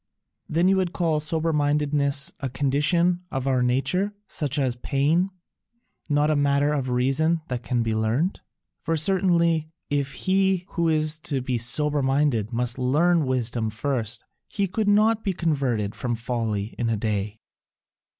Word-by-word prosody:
"Then 170 +4 +2
you 190 0 +4
would 185 -2 -1
call 160 -3 0
sober 160 +2 -1
mindedness 145 -1 +2
a 135 - -3
condition 150 +7 +1
of 135 -5 -3
our 130 -2 +1
nature, 180 +12 0
such 145 -6 -2
as 130 -4 0
pain, 150 +9 +1 0.8
not 145 +1 +2
a - - +2
matter 145 +1 +2
of 135 -3 -2
reason 135 +7 +1
that 125 -2 -3
can 120 +2 -1
be 115 -1 -1
learnt? 115 - 0 0.4
For 165 0 -1
certainly, 170 -2 +2 0.2
if 140 -1 -1
he 190 -1 +2
who 170 -1 0
is 155 0 +1
to 140 - +1
be 125 -1 -2
sober 145 +5 +1
minded 135 -5 +1
must 120 +1 -1
learn 155 +5 +2
wisdom 120 -3 -1
first, 115 0 -3 0.2
he 200 - -1
could 210 +3 -2
not 215 +2 +3
be 195 - 0
converted 135 - -1
from 120 -2 -3
folly 115 -3 -3
in 120 -1 0
a 115 - 0
day." 105 0 -2
145 Hz, 155 wpm, -24 LUFS, 125-165 Hz, 0.8 s, you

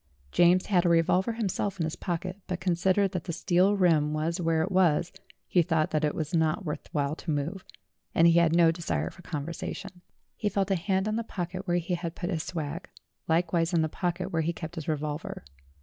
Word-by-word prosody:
James 175 +1 +4
had 180 -4 +3
a 175 - +2
revolver 180 +6 +3
himself 200 -3 -2
in - - +1
his 160 0 -2
pocket, 180 +2 -4
but 180 -1 -3
con 180 -1 +1
sidering 190 +3 +2
that 180 -4 -3
that 170 - -3
steel 180 +4 +3
rim 155 -5 +3
was 165 +4 -1
where 165 -1 +2
it 190 - -3
was, 175 -3 +3 0.4
he 180 - +4
thought 160 -2 +1
that 155 0 0
it 150 - +1
was 155 0 -3
not 160 +4 +1
worth 150 - -5
while 145 0 0
to 170 - -9
move, 155 +6 -2 0.5
and 165 - +5
he 170 0 +6
had 170 -1 +3
no 170 -1 +6
desire 80 - -2
for - - -15
conversation. 170 +2 -6 0.3
He 210 - -1
felt 200 0 0
a - - +4
hand 190 +2 0
in 215 +1 0
the 230 - -1
pocket 185 -2 -5
where 175 0 +2
he 175 +1 -2
had 170 -1 -3
put 175 +2 -3
his 165 -3 -1
swag; 160 +1 -5 0.4
likewise 170 +1 +1
in 160 - +3
the 160 - 0
pocket 180 +3 -2
where 165 - +2
he 165 +2 -1
kept 160 0 -7
his 160 -4 -6
revolver. 150 - -3
170 Hz, 220 wpm, -28 LUFS, 160-185 Hz, 0.5 s, he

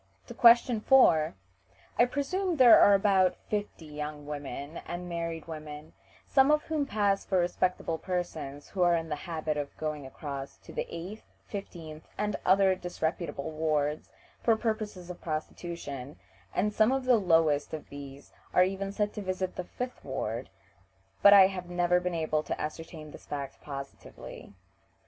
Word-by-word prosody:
To - - -9
question 235 -1 +6
4: 165 - +5 0.6
"I 240 - +7
presume 340 +8 -1
there 250 -3 +9
are 195 -2 +5 0.2
fifty 205 -5 -3
young 150 0 -6
women 145 +1 -6
and 175 +1 -5
married 165 -2 -4
women, 155 -1 -8 0.3
some 270 0 +4
of 300 0 +3
whom 305 -3 -1
pass 205 -4 +1
for 190 - 0
respectable 175 -2 0
persons, 160 -6 -4
who 190 - -3
are 175 -1 +5
in 165 -1 -3
the 150 - -1
habit 155 -2 -2
of 145 -1 -5
going 150 -3 -4
across 140 -1 -7
to - - -12
the - - -3
eighth, 185 +6 -7 0.2
fifteenth, 165 -6 -8
and 210 0 -1
other 190 0 +5
disreputable 170 -4 -3
wards 155 -1 -1 0.3
for 230 - +4
purposes 215 -5 -3
of 175 - -11
prostitution, 155 -3 -5 0.4
and 210 +3 +1
some 215 +3 +4
of 265 -1 0
the 250 -2 +5
lowest 165 -6 +2
of 155 -2 -7
these 140 -1 -10 0.2
are 180 - +7
even 195 +1 -2
said 205 0 -1
to 210 - -5
visit 185 -1 -3
the 180 - -4
fifth 250 +6 -6
ward, 120 -4 -4 0.7
but 200 - +9
I 200 -2 +10
have 185 -2 -3
never 175 0 +2
been 180 -1 -2
able 155 -1 0
to - - -4
ascertain 155 0 -6
this - - -13
fact 140 -2 -6
positively." 140 -7 -9
175 Hz, 160 wpm, -29 LUFS, 150-200 Hz, 0.7 s, I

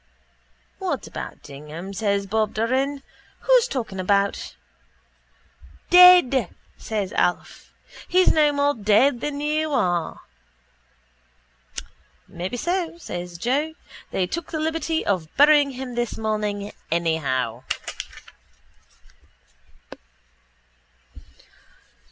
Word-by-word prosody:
—What 380 -2 -3
about - - -8
Dignam? 150 +7 -9
says 200 0 0
Bob 215 +1 -1
Doran. 265 +5 0 0.4
Who's - - +4
talking 225 - -4
about...? 200 +1 0 1.4
—Dead! 355 - +7 0.3
says 210 -4 -4
Alf. 175 - -1 0.4
He's 370 +1 +4
no 300 -2 +4
more 285 0 +1
dead 230 +3 +3
than 290 -1 -3
you 305 +1 0
are. 175 -9 0 2.1
—Maybe 180 +8 -5
so, 345 +3 -2
says 175 - -7
Joe. 285 - -1 0.3
They 185 - 0
took 335 - -5
the 315 - -3
liberty 320 0 -1
of 185 -6 0
burying 290 0 +6
him 260 -1 -7
this 240 -1 -2
morning 210 -2 -2 0.2
anyhow. 140 -8 0
235 Hz, 90 wpm, -23 LUFS, 190-300 Hz, 2.1 s, Dead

